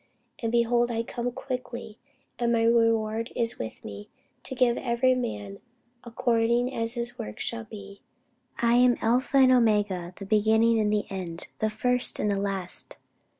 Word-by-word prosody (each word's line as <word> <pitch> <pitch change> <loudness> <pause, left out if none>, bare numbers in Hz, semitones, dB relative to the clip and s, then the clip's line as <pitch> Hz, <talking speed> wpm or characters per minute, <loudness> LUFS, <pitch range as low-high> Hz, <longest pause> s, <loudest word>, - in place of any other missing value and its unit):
And, 230 -1 -2
behold, 240 0 +2
I 230 -1 -1
come 240 +1 -4
quickly; 245 -4 -6 0.4
and 235 -1 +1
my 230 -1 +2
reward 230 -1 +2
is 230 -1 0
with 110 - -7
me, 100 0 -8 0.3
to 265 - -7
give 245 -2 +3
every 255 +1 +2
man 105 - -4 0.4
according 240 +1 +1
as 230 +1 -1
his 240 0 -4
work 105 0 -6
shall 230 -1 -3
be. 200 -2 -11 0.6
I 235 0 +3
am 245 0 +5
Alpha 250 +4 +1
and 260 -1 +6
Omega, 205 -7 +2
the 195 - -8
beginning 220 +2 +3
and 210 -1 +1
the 210 -1 0
end, 180 -3 -6
the 220 - +1
first 250 +3 +1
and 210 - 0
the 195 -1 -1
last. 195 -3 -5
230 Hz, 160 wpm, -27 LUFS, 210-240 Hz, 0.6 s, and